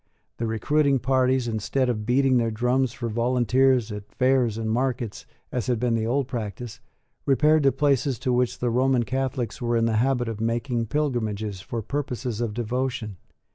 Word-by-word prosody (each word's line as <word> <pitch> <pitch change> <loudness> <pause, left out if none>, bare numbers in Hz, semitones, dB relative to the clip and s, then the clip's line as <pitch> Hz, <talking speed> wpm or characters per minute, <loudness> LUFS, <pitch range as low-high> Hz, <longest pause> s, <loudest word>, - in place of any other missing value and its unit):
The 115 - -2
recruiting 140 +6 +2
parties, 130 0 +1
instead 115 +4 0
of 105 -3 -2
beating 130 +1 +3
their 115 -1 +1
drums 125 +3 +1
for 120 -1 -5
volunteers 125 +1 +2
at 105 0 -8
fairs 125 -4 +2
and 115 -1 -3
markets, 120 - -2 0.2
as 125 -2 -2
had 120 -3 +1
been 120 0 +1
the 110 -1 0
old 135 +2 0
practice, 120 0 -5 0.5
repaired 150 +4 +4
to 135 -1 +4
places 140 -3 +1
to 125 - 0
which 125 0 +1
the 120 -1 -1
Roman 130 0 +2
Catholics 130 -2 -3
were 120 -1 +1
in 115 - +2
the 115 -1 +1
habit 125 0 +1
of 110 -1 -4
making 115 +1 -1
pilgrimages 110 -8 -2
for 115 0 -5
purposes 125 -3 -3
of 110 -3 -2
devotion. 120 -3 -2
120 Hz, 175 wpm, -25 LUFS, 115-130 Hz, 0.5 s, repaired